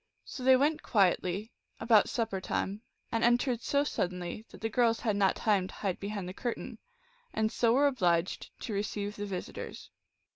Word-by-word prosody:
So 255 - -7
they 260 0 +7
went 300 +3 +2
quietly, 195 0 +1 0.3
about 220 -3 +4
supper 220 -5 -1
time, 200 +2 -2 0.3
and 230 - 0
entered 240 0 +3
so 285 0 +2
suddenly 180 -4 -3
that - - -14
the 225 - 0
girls 230 0 +2
had 215 -4 +1
not 195 -2 +3
time 200 -4 +1
to - - -12
hide 195 -4 -2
behind 200 -2 -4
the 185 - -6
curtain, 240 +3 -5 0.5
and 220 0 +1
so 230 -1 +3
were 280 +3 +4
obliged 180 -10 +1
to 220 - -4
receive 205 0 -2
the 205 0 -4
visit 185 -2 -5
ors. - - -8
215 Hz, 180 wpm, -31 LUFS, 195-240 Hz, 0.5 s, they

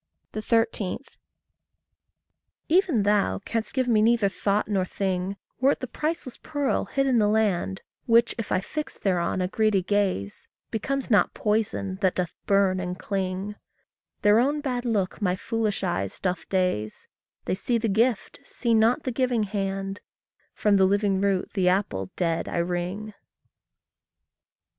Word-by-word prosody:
13. 220 -3 0 1.7
Even 335 - +3
thou 205 - +2
canst 225 +1 -2
give 260 -2 +1
me 220 -3 +4
neither 225 -2 +4
thought 200 +1 0
nor 200 -3 +1
thing, 190 +1 -2 0.2
Were 270 +3 +4
it - - -9
the - - -3
priceless 300 +1 -3
pearl 290 -3 -1
hid 275 0 0
in 255 -3 +3
the 210 - +3
land, 205 -3 +1 0.3
Which, 235 0 +4
if 230 - -4
I 185 - +2
fix 305 +9 -5
thereon 185 -1 0
a - - 0
greedy 210 -1 +2
gaze, 190 - -1 0.2
Becomes 265 +4 -2
not 210 - +4
poison 210 -3 -1
that 190 -2 +2
doth 180 -3 -2
burn 195 -2 +3
and 180 0 -4
cling; 195 0 -3 0.7
Their 210 +2 +6
own 285 +5 +2
bad 255 -4 -2
look 210 -4 -1
my 180 -3 +2
foolish 225 +1 -2
eyes 95 0 -2
doth 180 -3 -2
daze, 180 - -1 0.4
They - - 0
see 235 +5 0
the 225 0 -1
gift, 220 +2 +1
see 235 -2 -1
not 225 +6 +3
the 255 - -2
giving 245 -2 +1
hand 195 -1 -3 0.5
From 205 -2 +3
the 190 - +5
living 200 0 +2
root 195 -2 0
the 185 -3 +3
apple 105 - 0
dead 165 -2 -1
I - - -3
wring. 180 +5 -2
205 Hz, 150 wpm, -26 LUFS, 185-230 Hz, 1.7 s, Their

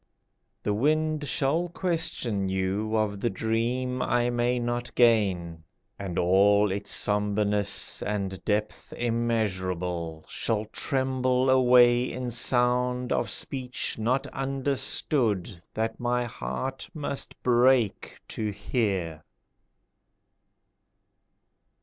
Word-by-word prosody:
The 105 - 0
wind 155 +5 +1
shall 160 +6 +1
question 145 - -1
you 95 +4 -1
Of 105 -2 -1
the 120 - 0
dream 120 +5 -1
I 120 -1 +1
may 120 +1 +1
not 120 0 -3
gain, 95 -9 +2 0.4
And 95 -3 -5
all 100 +3 +4
its 100 +1 -4
sombreness 105 0 +1
And 95 -3 -3
depth 105 0 -2
immeasurable, 95 -8 -2
Shall 110 -1 -1
tremble 130 +1 +1
away 125 -1 +5
in 125 -1 -4
sound 125 +1 +1
Of - - 0
speech 130 -3 -2
not 125 +5 0
understood 135 - -1
That 110 +1 -2
my 125 0 0
heart 130 +3 -5
must 145 -2 -3
break 125 -3 +2
to 110 -1 -3
hear. 95 -6 -2
120 Hz, 95 wpm, -27 LUFS, 100-125 Hz, 0.4 s, away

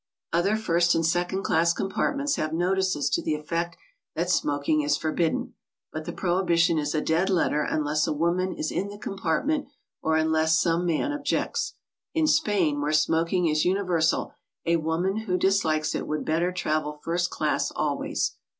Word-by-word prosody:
Other 185 +5 +2
first 175 -5 +2
and 165 - +1
second 175 +3 0
class 170 +1 +3
compartments 280 - -1
have 155 0 -2
notices 185 -2 +1
to - - +1
the 155 - -1
effect 170 +3 -3 0.4
that - - 0
smoking 310 -1 +1
is 295 0 +1
forbidden, 175 +11 -1 0.4
but 155 0 -5
the - - -4
prohibition 175 -2 +2
is 150 +1 -2
a 155 - +1
dead 165 +5 +1
letter 165 -5 +2
unless 150 0 0
a - - 0
woman 170 +4 0
is 155 - -3
in 195 - -1
the 205 0 -9
compartment 205 - -1 0.3
or 160 0 +1
un 160 0 +1
less 160 0 +3
some 170 +1 +1
man 170 - 0
objects. 295 - -2 0.4
In 320 -1 +3
Spain, 180 - +2
where 150 +1 0
smoking 165 +3 +2
is 155 -1 +2
univer 180 -2 +1
sal, 160 - +1 0.3
a 170 0 +3
woman 165 +5 -1
who 220 -5 -1
dislikes 165 -6 +1
it - - -3
would 150 0 -2
better 165 +3 +1
travel 155 -4 -2
first 175 +1 0
class - - 0
always. - - -1
170 Hz, 170 wpm, -26 LUFS, 160-190 Hz, 0.4 s, class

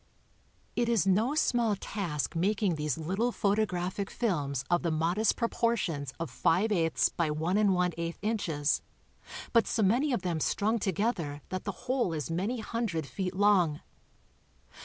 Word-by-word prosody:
It 240 -1 +1
is 225 -6 +2
no 215 +9 +2
small 235 -7 +2
task 175 -7 -3
making 195 +2 +1
these 150 -3 -2
little 195 +10 -1
photographic 200 -3 0
films 145 - -1
of 175 0 +2
the 170 - 0
modest 170 +7 +1
proportions 230 - -1
of 165 - -4
five 205 +7 +2
eighths 165 -5 +2
by 170 -2 -1
one 160 +5 -1
and 205 -2 +4
one 180 0 +2
eighth 170 0 -3
incfies, 185 -9 0 0.7
but 230 -2 +4
so 225 - +1
many 245 +9 +3
of 235 -7 -1
them 170 -3 -1
strung 215 +8 +1
together 185 - -1
that 185 0 -4
the 200 - -1
whole 250 -8 +1
is 150 -2 -3
many 205 +8 -1
hundred 215 -9 -2
feet 185 +5 -4
long. 185 -7 +3
190 Hz, 155 wpm, -30 LUFS, 165-220 Hz, 0.7 s, and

